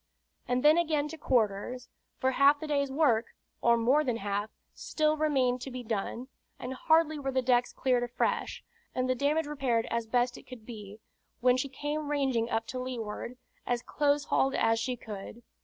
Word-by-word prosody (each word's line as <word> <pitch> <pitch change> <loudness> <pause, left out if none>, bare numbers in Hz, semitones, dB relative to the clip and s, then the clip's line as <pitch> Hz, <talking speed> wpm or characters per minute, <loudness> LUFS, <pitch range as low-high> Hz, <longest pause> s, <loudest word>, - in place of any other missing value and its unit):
And 250 0 0
then 305 +3 +6
again 305 -3 +1
to 320 - -8
quarters; 245 -1 0 0.3
for 260 - +1
half 280 +2 +5
the 310 - -5
day's 280 -2 0
work, 265 -6 +2 0.3
or 235 0 +4
more 255 +7 +3
than 245 -5 -1
half, 205 0 -2 0.2
still 310 -1 0
remained 265 -5 +1
to 270 - -5
be 255 -1 -6
done; 230 +2 -3 0.3
and 250 +1 -5
hardly 315 +2 +2
were 270 -1 -3
the 260 -1 0
decks 245 -1 +2
cleared 255 -2 +1
afresh, 240 0 -2 0.3
and 255 0 0
the 255 - +2
damage 290 +5 +1
repaired 265 -6 0
as 235 -1 -1
best 245 +1 +1
it - - -19
could 245 -4 -11
be, 210 -3 -9 0.4
when 250 0 +4
she 255 +2 -2
came 290 +2 -4
ranging 265 -5 0
up 225 -1 -1
to 255 - -5
leeward, 245 -1 -5 0.3
as 245 0 0
closehauled 285 -2 +1
as 225 0 +2
she 250 +2 -2
could. 220 +1 -9
255 Hz, 180 wpm, -30 LUFS, 235-290 Hz, 0.4 s, then